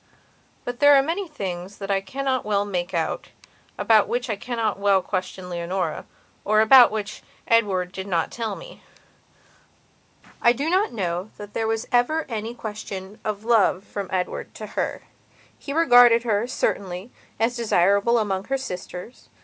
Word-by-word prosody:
But 245 0 -5
there 290 0 +7
are 270 - +5
many 350 +6 -2
things 190 - -6
that 200 0 -4
I 195 -1 +1
cannot 260 +5 -2
well 205 -1 0
make 180 -2 -3
out, 165 -3 -2 0.5
about 220 -2 +4
which 245 0 -2
I - - -1
cannot 225 -1 -2
well 200 -1 +4
question 185 -1 -4
Leonora, 175 +2 -3 0.4
or 215 +1 +3
about 240 +3 +8
which 215 -1 -5 0.3
Edward 195 -6 +2
did 190 0 -6
not 170 -4 0
tell 230 -2 -3
me. - - -12 1.6
I 235 - +5
do 285 +7 -2
not 385 +4 +2
know 180 -2 -3
that 205 0 -10
there 225 - -1
was 225 0 -2
ever 275 +7 +2
any 225 0 -4
question 210 -3 -7
of 215 0 -4
love 205 -5 +3
from 200 -2 -6
Edward 185 -1 -3
to - - -7
her. - - -2 0.6
He 280 - -7
regarded 245 -6 +6
her, 220 -1 0
certainly, 195 -4 -2 0.3
as 230 +2 +1
desirable 200 0 +3
amongst 200 -2 -2
her 270 - +1
sisters. 180 -2 -8
215 Hz, 155 wpm, -23 LUFS, 190-245 Hz, 1.6 s, about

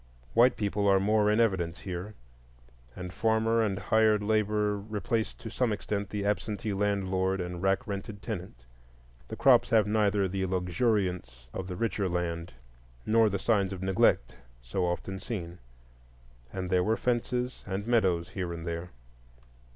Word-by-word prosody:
White 120 +1 +5
people 100 -1 0
are 95 -1 +5
more 105 +1 +3
in 105 +2 +3
evidence 95 -7 +1
here, 95 +3 -6 0.8
and 90 0 -7
farmer 115 +1 +2
and 100 -3 0
hired 110 +1 +3
labor 105 -1 +1
replace 110 +2 -2
to 115 - -9
some 125 0 0
extent 100 -1 -3
the 105 -1 -3
absentee 105 +1 -1
landlord 95 -1 0
and 90 -1 -4
rack 95 0 +1
rented 100 0 -5
tenant. 90 - -6 0.6
The - - -6
crops - - +5
have 110 -3 +4
neither 105 -2 +2
the 95 0 -2
luxuriance 90 - -1
of 95 - -4
the 90 - -5
richer 105 -2 -1
land 85 -3 -3 0.5
nor 110 0 +4
the 100 - -1
signs 100 -4 +1
of 95 -1 -5
neglect 95 -10 +2 0.3
so 90 +9 -1
often 95 +2 -3
seen, 90 -4 -6 0.9
and 95 -1 -4
there 90 -1 +3
were 110 +4 +1
fences 125 +1 -1
and 100 +1 -3
meadows 95 -8 +2
here 90 -3 -4
and 85 -1 -6
there. 85 +1 -4
100 Hz, 150 wpm, -29 LUFS, 90-110 Hz, 0.9 s, White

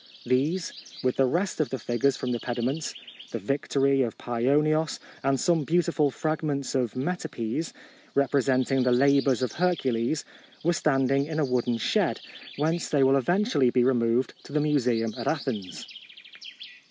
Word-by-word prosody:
These, 155 +8 0 0.3
with 130 -1 0
the 135 - +4
rest 180 +8 -1
of 155 - +1
the 135 - -3
figures 120 +3 0
from 125 - -3
the 120 - -1
pediments, 125 +6 -3 0.3
the - - -4
Victory 135 +3 +1
of 120 -3 -2
Paionios, 145 +6 +1 0.2
and 135 -1 +1
some 170 -3 +2
beautiful 165 -1 +2
fragments 150 -2 -2
of 125 -4 -1
metopes, 140 -2 -3 0.4
re 140 - +4
presenting 135 -1 +1
the 125 0 +2
Labours 135 0 +3
of 125 - -1
Hercules, 150 -6 0 0.4
were 175 +2 +2
standing 135 -3 +1
in 155 -1 -4
a 155 - +2
wooden 125 -2 0
shed, 115 - 0 0.4
whence 160 +4 0
they 140 -3 +3
will 135 +1 +5
eventually 175 - +2
be 125 0 +2
re 130 +2 +3
moved 120 +1 +1
to - - -12
the 150 - +1
museum 125 -7 +1
at - - -4
Athens. 115 - -3
135 Hz, 155 wpm, -26 LUFS, 125-155 Hz, 0.4 s, will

